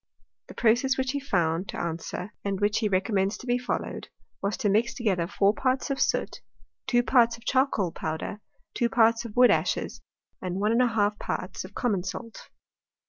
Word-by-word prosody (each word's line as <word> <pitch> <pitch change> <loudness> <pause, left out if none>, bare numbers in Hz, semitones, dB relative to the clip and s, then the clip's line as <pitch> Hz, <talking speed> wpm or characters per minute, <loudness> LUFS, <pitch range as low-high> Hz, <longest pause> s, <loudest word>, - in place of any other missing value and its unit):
The - - -12
process 250 +3 +3
which 260 -1 0
he 285 - -2
found 175 - 0
to - - -5
answer, 170 +4 -4
and 195 -1 -2
which 205 0 +2
he 215 -2 0
recommends 195 +1 +1
to - - -11
be 245 0 +1
followed, 250 - -4 0.3
was 200 +1 -1
to 235 - 0
mix 220 +4 +2
together 190 -8 0
4 200 +1 +2
parts 260 +3 0
of 270 - -2
soot - - 0 0.5
2 245 -2 +3
parts 235 -2 +4
of 230 - -20
charcoal 255 -9 +1
powder 160 +6 -4 0.3
2 235 - +1
parts 230 0 +3
of 220 - -8
wood 250 0 +7
ashes - - -1 0.4
1 185 0 -3 0.2
J 220 -5 +3
parts 180 - -4
of 190 +2 -12
common 215 -7 0
salt. 225 +5 -7
215 Hz, 175 wpm, -27 LUFS, 195-245 Hz, 0.5 s, wood